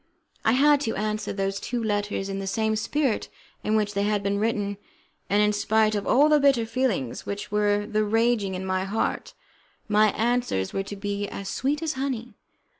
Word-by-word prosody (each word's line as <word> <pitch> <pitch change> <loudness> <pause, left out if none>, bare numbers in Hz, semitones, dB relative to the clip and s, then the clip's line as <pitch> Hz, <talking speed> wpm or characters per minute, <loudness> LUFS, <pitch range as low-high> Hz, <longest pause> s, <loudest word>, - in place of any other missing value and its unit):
I 225 - +3
had 290 +2 +5
to 225 -6 -1
answer 215 +1 -2
those 195 0 -2
two 240 -1 -3
letters 205 -2 -1
in 195 0 -4
the 195 - -4
same 220 +2 0
spirit 260 +2 -1 0.3
in 215 - +1
which 210 -1 +1
they 200 - 0
had 205 0 0
been 200 +1 0
written, 205 -2 -1 0.5
and 205 +1 +4
in 210 0 +2
spite 215 +1 +2
of 205 -1 -2
all 285 +4 +5
the 300 -1 +5
bitter 275 -5 +3
feelings 225 - -2
which 200 0 -5
were 205 0 +2
then 215 -1 0
raging 225 -3 +2
in 185 +1 -4
my 185 0 0
heart, 200 +4 -2 0.5
my 215 0 +4
answers 235 - 0
were 195 - 0
to 200 +1 -7
be 205 0 -3
as 195 -1 -6
sweet 290 +8 -1
as 315 -1 -1
honey. 255 -3 -3
210 Hz, 190 wpm, -25 LUFS, 200-235 Hz, 0.5 s, had